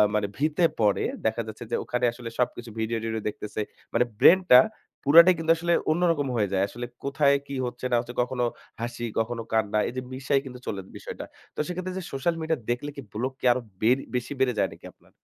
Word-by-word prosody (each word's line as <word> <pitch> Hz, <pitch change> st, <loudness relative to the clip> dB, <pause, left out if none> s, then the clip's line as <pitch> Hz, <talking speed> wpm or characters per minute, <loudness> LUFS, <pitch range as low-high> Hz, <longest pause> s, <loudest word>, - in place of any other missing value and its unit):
মানে 105 Hz, -1 st, +1 dB
ভিতে 155 Hz, +4 st, +1 dB, 0.2 s
পড়ে, 105 Hz, -3 st, +3 dB, 0.2 s
দেখা 110 Hz, +1 st, +1 dB
যাচ্ছে 110 Hz, +1 st, -7 dB
যে -, -, +2 dB
ওখানে 125 Hz, 0 st, -1 dB
আসলে 120 Hz, 0 st, -8 dB
সবকিছু, 120 Hz, -1 st, -1 dB
ভিডিও-টিডিও 110 Hz, 0 st, -2 dB
দেখতেছে। 105 Hz, +1 st, -5 dB, 0.3 s
মানে -, -, +4 dB, 0.2 s
ব্রেইনটা 170 Hz, -3 st, +8 dB, 0.4 s
পুরাটাই 170 Hz, +5 st, +8 dB
কিন্তু 165 Hz, 0 st, +2 dB
আসলে 170 Hz, +1 st, +1 dB, 0.2 s
অন্যরকম 165 Hz, -4 st, +2 dB
হয়ে 105 Hz, -3 st, +2 dB
যায়। 95 Hz, -, +2 dB
আসলে 120 Hz, +4 st, -6 dB, 0.2 s
কোথায় 140 Hz, 0 st, +3 dB
কি 140 Hz, -, -5 dB
হচ্ছে 125 Hz, +1 st, -6 dB
না -, -, +4 dB
হচ্ছে? 120 Hz, 0 st, -6 dB
কখনো 125 Hz, 0 st, -1 dB, 0.4 s
হাসি, 120 Hz, 0 st, -4 dB
কখনো 115 Hz, +1 st, -1 dB
কান্না 110 Hz, -1 st, +2 dB
এইযে 130 Hz, +1 st, -4 dB
মিশায় 135 Hz, +1 st, +1 dB
কিন্তু 125 Hz, -1 st, -8 dB
চলে 100 Hz, -2 st, -3 dB, 0.2 s
বিষয়টা। -, -, -7 dB, 0.3 s
তো -, -, -7 dB
সেক্ষেত্রে 185 Hz, +1 st, -4 dB
যে 190 Hz, -, -4 dB
সোশ্যাল 165 Hz, +5 st, 0 dB
মিডিয়া 160 Hz, 0 st, 0 dB
দেখলে 120 Hz, +4 st, -1 dB
কি, 140 Hz, -, -6 dB
ব্লক 125 Hz, +5 st, -2 dB
কি -, -, -6 dB
আরো 125 Hz, -, +1 dB, 0.2 s
বেড় 125 Hz, +5 st, +4 dB, 0.2 s
বেশি 125 Hz, +2 st, -2 dB
বেড়ে 130 Hz, -2 st, +3 dB
যায় -, -, +2 dB
নাকি -, -, -13 dB
আপনার? -, -, -27 dB
125 Hz, 195 wpm, -26 LUFS, 115-145 Hz, 0.4 s, ব্রেইনটা